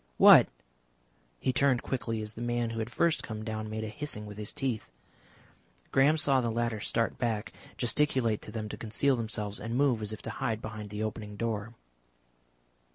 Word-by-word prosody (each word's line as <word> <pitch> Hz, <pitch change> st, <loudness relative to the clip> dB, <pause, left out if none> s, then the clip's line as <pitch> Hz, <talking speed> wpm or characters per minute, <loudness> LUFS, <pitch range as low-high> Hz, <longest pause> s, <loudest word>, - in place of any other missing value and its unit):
What?" -, -, +9 dB, 0.9 s
He 130 Hz, -, 0 dB
turned 130 Hz, -1 st, +3 dB
quickly 115 Hz, -4 st, -2 dB
as 105 Hz, 0 st, -7 dB
the 115 Hz, -, -8 dB
man 120 Hz, -1 st, 0 dB
who 115 Hz, -, -4 dB
had 110 Hz, +1 st, -2 dB
first 170 Hz, +6 st, +2 dB
come 110 Hz, -1 st, -6 dB
down 110 Hz, -1 st, -3 dB
made 110 Hz, 0 st, -3 dB
a -, -, -3 dB
hissing 110 Hz, -3 st, -3 dB
with 105 Hz, 0 st, -9 dB
his 105 Hz, -, -3 dB
teeth. 130 Hz, -, -2 dB, 1.0 s
Graham 145 Hz, +4 st, +5 dB
saw 140 Hz, -4 st, +3 dB
the 120 Hz, -, 0 dB
latter 115 Hz, -1 st, -1 dB
start 115 Hz, +2 st, -1 dB
back, 115 Hz, -3 st, -1 dB, 0.2 s
gesticulate 120 Hz, -3 st, +2 dB
to -, -, -8 dB
them 110 Hz, -1 st, -4 dB
to -, -, -6 dB
conceal 125 Hz, +5 st, +1 dB
themselves, 110 Hz, -3 st, -3 dB
and 115 Hz, +2 st, -3 dB
move 130 Hz, -5 st, +3 dB
as 105 Hz, 0 st, -3 dB
if 110 Hz, -1 st, -7 dB
to -, -, -4 dB
hide 115 Hz, -5 st, -2 dB
behind 110 Hz, -2 st, -7 dB
the 105 Hz, +1 st, -3 dB
opening 105 Hz, -1 st, -4 dB
door. 115 Hz, 0 st, -2 dB
115 Hz, 185 wpm, -30 LUFS, 110-125 Hz, 1.0 s, What